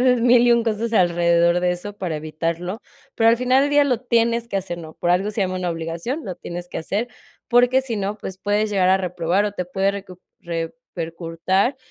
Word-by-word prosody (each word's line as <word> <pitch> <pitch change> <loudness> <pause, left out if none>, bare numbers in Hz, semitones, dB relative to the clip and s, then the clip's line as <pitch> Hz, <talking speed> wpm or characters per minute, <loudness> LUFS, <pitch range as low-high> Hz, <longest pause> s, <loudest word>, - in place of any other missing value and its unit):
haces 250 -1 +3
1000 245 0 +5
y 240 - +6
1 235 -1 +3
cosas 225 +1 -1
alrededor 170 -2 +3
de 180 0 +1
eso 200 +4 -6
para 185 -5 -4
evitarlo. 165 +5 -3 0.4
Pero 225 - +4
al 230 - +5
final 255 +2 +3
del 285 - 0
día 290 0 +5
lo 255 -5 +1
tienes 235 -1 +1
que 200 - -3
hacer, 180 -3 -4
¿no?, 160 -2 -10
por 175 - -1
algo 195 +4 +1
se 210 - -3
llama 185 -1 0
una 180 -1 -2
obligación. 170 - -4
Lo 185 -3 -5
tienes 175 0 -7
que - - -5
hacer, 205 +8 -2 0.4
porque 245 +2 +4
si 240 -4 -4
no, 200 +1 -2
pues 190 -1 -7
puedes 205 +2 0
llegar 190 -3 +2
a 190 +1 +4
reprobar 180 +1 0
o 205 - -3
te 180 -3 -3
puede 190 +2 0
recu 195 -3 -9 0.2
repercutir 170 - -2
195 Hz, 215 wpm, -22 LUFS, 175-235 Hz, 0.4 s, y